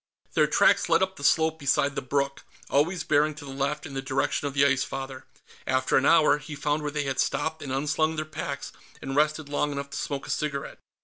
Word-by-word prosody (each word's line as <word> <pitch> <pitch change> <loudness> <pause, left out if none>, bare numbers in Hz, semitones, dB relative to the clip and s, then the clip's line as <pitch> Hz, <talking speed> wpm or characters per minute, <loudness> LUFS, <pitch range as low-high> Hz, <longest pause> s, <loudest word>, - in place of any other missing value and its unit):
Their - - +4
tracks - - +3
led - - +4
up 190 0 -2
the 140 - -10
slope 160 +2 +3
beside 140 0 +2
the - - -3
brook, 140 +1 -1 0.3
always 165 +6 +2
bearing 150 +1 +2
to 145 - -10
the 135 - -8
left, 140 +2 -2
in 145 - -8
the 135 - -3
direction 135 +2 -1
of 140 - -6
the 140 0 +5
Ice 140 -2 +3
Father. 135 -1 -6 0.4
After 130 0 +1
an 135 - +4
hour, 155 -3 +5
he 150 +1 -8
found 150 +1 -1
where 150 - -2
they 145 0 -2
had 135 -1 -3
stopped 160 0 -1
and 135 - -5
unslung 155 +4 0
their 155 0 -3
packs, 140 -2 -5 0.3
and 135 0 -5
rested 155 +1 +1
long 145 0 -1
enough 140 0 -5
to - - -5
smoke 140 -2 -3
a - - -4
cigarette. 140 -2 -3
145 Hz, 230 wpm, -26 LUFS, 140-155 Hz, 0.4 s, the